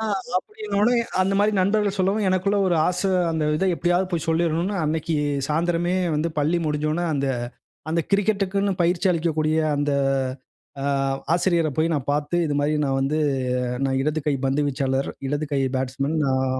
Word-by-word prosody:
ஆ, - - -2 0.3
அப்பிடின்னவுனே 245 - 0 0.3
அந்தமாரி 195 +3 +2
நண்பர்கள் 200 +1 +1
சொல்லவும் 195 +2 +1
எனக்குள்ள 185 +2 +1
ஒரு 175 - +2
ஆச, 180 - -2 0.3
அந்த 160 -1 -1
இத 190 - 0
எப்பிடியாவது 175 +2 +1
போய் 170 -4 -2
சொல்லிரணுன்னு, 170 +4 +1
அன்னக்கி 160 +1 -1 0.3
சாயந்தரமே 170 +3 0 0.2
வந்து 155 +3 0
பள்ளி 155 +4 +2
முடிஞ்சவுன 155 +3 -1
அந்த 140 -1 -1 0.6
அந்த 165 +1 +1
கிரிக்கெட்க்குன்னு 200 -1 +1
பயிற்சி 175 +2 +2
அளிக்கக்கூடிய 160 -2 0 0.2
அந்த 145 0 0 0.9
அ 140 - -1 0.5
ஆசிரியர 170 -2 +2
போய் 160 +1 +2
நான் 145 -2 -2
பார்த்து, 145 +3 -1
இதுமாரி 145 +1 0
நான் 135 -1 0
வந்து 145 +3 0 0.7
நான் 135 -1 0
இடது 155 +3 0
கை 145 - +2
பந்து 135 +2 +1
வீச்சாளர் 135 0 -1 0.2
இடது 145 +2 -1
கை 140 - +1 0.2
பேட்ஸ்மேன் 135 +3 -2
நான் 130 -1 +1
165 Hz, 150 wpm, -23 LUFS, 145-185 Hz, 0.9 s, அந்தமாரி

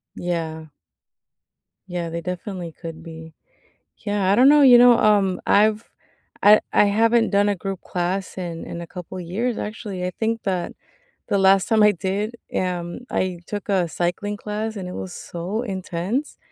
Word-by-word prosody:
Yeah. 160 -2 -4 1.2
Yeah, 175 -2 -4
they 170 +1 -4
definitely 180 0 -5
could 165 0 -9
be. 160 -1 -10 0.6
Yeah, 205 -3 -1
I - - +5
don't 250 +5 +6
know, 295 0 +6
you 250 -3 +8
know, 240 -1 +7
um, 200 -4 +3
I've 215 +2 +3 0.6
I 210 +1 +7
I - - +5
haven't 225 +3 +3
done 200 0 +3
a 205 - 0
group 195 0 -5
class 180 +2 -3
in 170 -3 -5
in 170 - -7
a 170 - -7
couple 180 +1 -8
years, 215 +8 -2
actually. 210 -3 -5
I 180 - -1
think 225 0 -1
that 185 -3 -2 0.6
the 200 - +1
last 195 0 +4
time 220 -2 +4
I 210 0 +6
did, 200 +5 -3 0.2
um, 175 0 -2
I 185 -2 -1
took 205 0 -6
a 185 -4 +1
cycling 175 +5 -2
class, 215 +2 -4
and 185 -2 -5
it 180 - -7
was 185 - -6
so 180 +8 -5
intense. 195 - -3
195 Hz, 165 wpm, -22 LUFS, 175-215 Hz, 1.2 s, you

